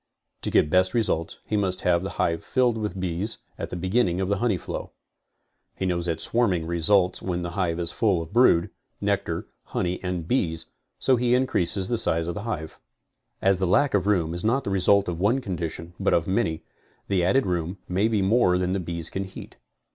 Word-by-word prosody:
To - - -2
get 75 - +3
best 95 +2 +3
results 85 -8 0
he 110 - -2
must 95 -3 0
have 85 -1 +2
the 95 - -4
hive 85 0 0
filled 125 -3 +1
with 105 -3 -4
bees 95 +4 -1 0.2
at - - -4
the - - -5
beginning 95 0 +1
of 95 0 -1
the 100 - +1
honey 115 -5 +1
flow. - - -6 0.8
He 95 - -3
knows 90 -1 -1
that 80 -2 -1
swarming 95 -8 +2
results 90 +3 +2
when 90 -2 -2
the 85 - -4
hive 90 -2 -1
is 85 -1 -1
full 100 -6 +1
of 80 -1 -7
brood, 115 -8 +4 0.3
nectar, - - -1 0.2
honey 90 +1 -3
and 90 -3 -3
bees, 80 -9 0 0.3
so 130 -2 +2
he 120 +1 +2
increases 95 -7 +1
the 120 -2 +1
size 80 0 +3
of 85 - -3
the 105 - -5
hive. 80 -7 -5 0.6
As 95 -1 +3
the 95 - +1
lack 140 +10 +3
of 100 -1 +1
room 85 -6 +1
is 85 - -4
not 125 +5 +1
the 100 - -3
result 95 +1 +3
of 85 -2 -3
one 110 +8 +2
condition, 85 -5 -5
but - - +2
of 85 - +1
many, 95 -5 -1 0.4
the 95 -3 +1
added 115 +9 +3
room 90 0 -2
may 95 +4 +1
be 110 -4 +1
more 95 -3 +3
than 90 0 -1
the 95 - 0
bees 85 -2 -3
can 95 0 -3
heat. 95 - -11
95 Hz, 210 wpm, -25 LUFS, 85-105 Hz, 0.8 s, brood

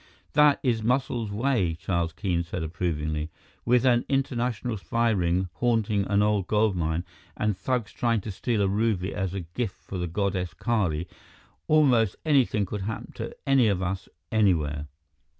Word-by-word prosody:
"That 150 -1 +5
is 120 -4 +1
Muscles' 120 -1 0
way," 105 -6 +1
Charles 85 -1 -1
Keene 90 0 -1
said 85 0 -4
approvingly. 80 -2 -2 0.4
"With 125 +1 +3
an 120 -2 +4
international 125 -4 -1
spy 115 +4 +1
ring 90 -2 +1
haunting 110 -4 +1
an 100 +1 +3
old 105 -3 +1
gold 105 -2 +2
mine 80 0 -1 0.3
and 105 -1 0
thugs 120 -1 -2
trying 115 -3 +1
to 105 - -5
steal 105 +2 0
a - - +2
ruby 100 -2 0
as 95 -1 -2
a 95 - -2
gift 95 +6 -4
for 95 - -5
the 90 - -1
goddess 90 -1 -2
Kali, 90 -9 0 0.6
almost 125 -10 +4
anything 130 -9 +3
could 100 +2 -5
happen 110 +3 -5
to - - -6
any 135 -4 +4
of 95 -3 +1
us, 95 +1 -3 0.2
anywhere!" 75 -9 +1
105 Hz, 160 wpm, -26 LUFS, 90-120 Hz, 0.6 s, That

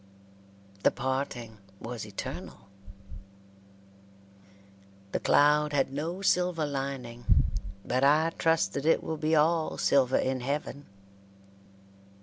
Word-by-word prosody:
The - - +5
parting 130 -4 -4 0.2
was 115 -2 -6
eternal. 100 -1 -7 2.4
The - - -1
cloud 150 +1 +3
had 135 -1 +1
no 165 +7 -4
silver 180 -4 +2
lining, 135 -4 -5 0.6
but 130 +2 0
I 155 +4 +4
trust 160 -12 +1
that 140 +2 -3
it 165 - +3
will 160 - -3
be 155 +1 +1
all 160 +1 +2
silver 135 -2 +3
in 130 0 0
heaven. 145 +2 -4
140 Hz, 105 wpm, -28 LUFS, 130-155 Hz, 2.4 s, The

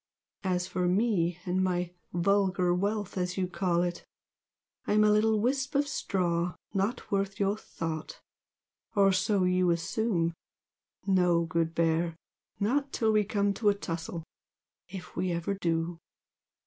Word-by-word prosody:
As 180 -1 0
for 180 -1 -1
ME 180 -3 +2
and 185 +1 +1
my 180 -1 0 0.2
'vulgar 185 0 +2
wealth' 200 +1 -1
as 180 +1 -2
you 190 - +1
call 175 -1 +1
it, 175 0 -3 0.8
I'm 215 +1 +4
a 210 - +5
little 215 +1 +3
wisp 270 +5 0
of 285 +1 +3
straw 180 - -1 0.2
not 200 +5 -1
worth 195 0 -1
your 200 0 +2
thought! 165 -6 -5 0.8
or 195 -1 +5
so 190 +1 +2
you 180 0 +3
assume 170 0 0 0.7
no, 180 -3 +3
good 165 0 -1
Bear! 165 0 +1 0.4
not 275 +7 +1
till 220 -1 +1
we 215 -1 +4
come 200 0 +1
to 210 0 +2
a 200 - +2
tussle 165 -3 -5 0.6
if 185 0 -9
we 180 0 0
ever 170 +3 -1
do!" 170 -2 -1
185 Hz, 140 wpm, -29 LUFS, 175-205 Hz, 0.8 s, a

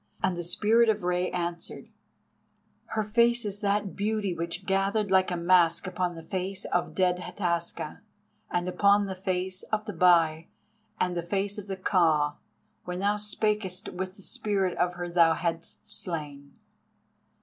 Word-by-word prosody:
And 190 -1 +2
the 175 - -4
Spirit 220 +6 +3
of 210 -3 +1
Rei 180 0 0
answered: 170 -1 -5 1.0
"Her 220 - -2
face 235 +2 +2
is 205 -1 -4
that 205 -1 0
beauty 210 -2 -1
which 170 +2 -4
gathered 195 +2 +1
like 190 -1 +4
a 180 - -2
mask 170 0 +3
upon 180 -1 -2
the 165 - -9
face 190 +2 -3
of 175 - -1
dead 180 -1 +2
Hataska, 175 -2 -3 0.5
and 175 0 -1
upon 200 +3 +4
the 195 - -4
face 185 0 -2
of 215 0 -3
the 210 - -5
Bai, 165 -2 +4 0.5
and 180 -1 0
the 170 - -1
face 200 +4 -2
of 205 - -9
the 195 -1 -4
Ka, 160 -6 +2 0.5
when 180 0 -5
thou 200 +2 +1
spakest 210 -2 0
with 185 +1 -5
the 195 - -14
spirit 195 -3 -1
of 180 0 +1
her 175 0 -4
thou 170 -2 +4
hadst 170 +5 -4
slain." 145 -7 -5
185 Hz, 160 wpm, -28 LUFS, 175-200 Hz, 1.0 s, like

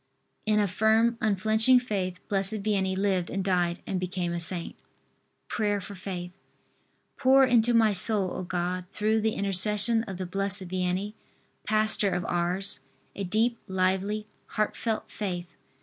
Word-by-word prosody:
In 210 0 +3
a 205 - +2
firm 220 +5 +3
unflinching 220 +4 +3
faith 190 -7 -4
Blessed 195 +1 -1
Vianney 190 -3 0
lived 190 -3 0
and 195 0 -2
died 180 -2 0
and 190 - -2
became 180 -1 -2
a 170 - -2
saint. 170 0 -1 0.7
PRAYER 205 -2 0
FOR 200 +2 -8
FAITH. 185 -2 -6 0.9
Pour 270 0 +5
into 240 -1 +3
my 220 -2 +4
soul, 195 -1 +2
O - - -4
God, 180 0 -2
through 215 +1 +1
the 220 0 0
intercession 210 +3 +3
of 190 -4 -6
the 185 - -4
Blessed 195 0 -1
Vianney, 185 +3 -1 0.5
pastor 215 -1 +2
of 180 -2 -2
Ars, 175 +3 -1 0.4
a 200 - -4
deep 220 +5 +1
lively 190 +3 0 0.2
heartfelt 215 +1 -2
faith! 175 -4 -4
195 Hz, 145 wpm, -27 LUFS, 185-215 Hz, 0.9 s, Pour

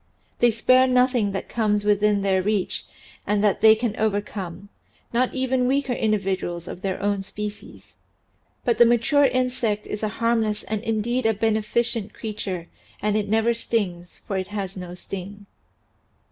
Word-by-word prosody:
They 240 - +5
spare 255 +3 +4
nothing 250 -4 +3
that 195 - -4
comes 210 -3 0
within 210 -1 +3
their 190 -1 +2
reach 205 -1 -1 0.4
and 205 0 +1
that 205 -3 +2
they 220 0 +8
can 220 -1 -2
overcome 200 -3 -3 0.4
not 250 +2 +2
even 260 -1 +1
weaker 270 -1 +1
individuals 195 -6 -1
of 180 - -7
their 190 -1 -2
own 205 -1 +1
species. 210 +1 -8 0.7
But 235 -2 +1
the 240 - +9
mature 240 +5 +4
insect 250 -5 0
is 210 - -5
a 215 - 0
harmless 225 -2 +1
and 210 +1 -3
indeed 225 +2 0
a 220 - +2
beneficent 220 0 0
creature 195 -5 -4 0.3
and 210 0 0
it 210 -1 -1
never 225 +2 +3
stings, 190 -7 -3
for 195 - -2
it 185 0 -3
has 200 -2 -4
no 180 -1 -7
sting. 195 +2 -8
210 Hz, 155 wpm, -24 LUFS, 200-235 Hz, 0.7 s, the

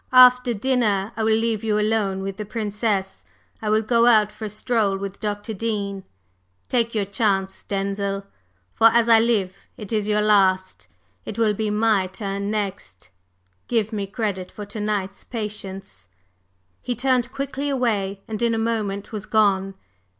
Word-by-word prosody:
After 250 0 +7
dinner 215 -4 +1
I 225 - -2
will 220 0 +3
leave 225 -2 -1
you 210 -1 +1
alone 210 -3 0
with 195 0 -5
the 215 - -4
Princess. 210 -2 -2 0.4
I 215 - -2
will 215 +1 +3
go 235 +1 +3
out 215 -3 +5
for 215 +1 -7
a - - -4
stroll 215 -2 0
with 195 0 -6
Dr. 205 +1 -3
Dean. 200 -2 -3 0.6
Take 235 -2 0
your 205 -2 +1
chance, 195 -1 0
Denzil, 195 0 -2 0.5
for, 225 - +6
as 230 0 +3
I 225 -1 +7
live, 215 -5 +1 0.2
it 210 0 -7
is 210 -1 0
your 210 0 +2
last! 190 -3 +2 0.4
It 215 - -7
will 220 -2 +3
be 215 +1 -2
my 210 -2 +2
turn 200 +1 -4
next! 195 - -4 0.6
Give 225 -2 0
me 200 -2 -2
credit 200 -3 -3
for 210 - -8
to 205 +2 -7
night's 205 -2 -2
patience!" 200 - -7 0.7
He 245 - -3
turned 250 0 +1
quickly 275 +1 -3
away, 210 -7 -1
and 220 0 -5
in 235 -1 +2
a - - -1
moment 215 -3 -2
was 215 -2 -6
gone. 195 -3 +2
210 Hz, 165 wpm, -23 LUFS, 195-225 Hz, 0.7 s, After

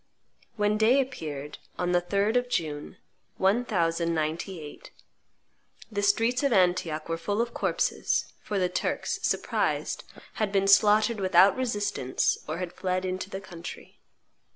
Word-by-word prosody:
When 210 -1 +1
day 235 +5 +5
appeared, 150 - -4 0.2
on 180 0 0
the 175 0 +3
3d 200 +5 0
of 245 0 +1
June, 155 -4 -3 0.4
1098, 170 -5 -1 1.0
the 205 -1 -1
streets 225 +5 +2
of 280 -2 +1
Antioch 175 -5 +2
were 165 0 -2
full 205 +5 -2
of 235 0 -1
corpses; - - 0 0.2
for 205 - -3
the 185 -1 +2
Turks, 180 - -2
surprised, - - -1 0.4
had 210 -2 +1
been 195 -1 +2
slaughtered 210 +2 +5
without 190 0 +5
resistance 205 - 0
or 155 +2 -3
had 180 -1 -5
fled 185 0 -2
into 185 +1 -3
the 195 - -5
country. 175 -3 -10
190 Hz, 130 wpm, -27 LUFS, 170-210 Hz, 1.0 s, day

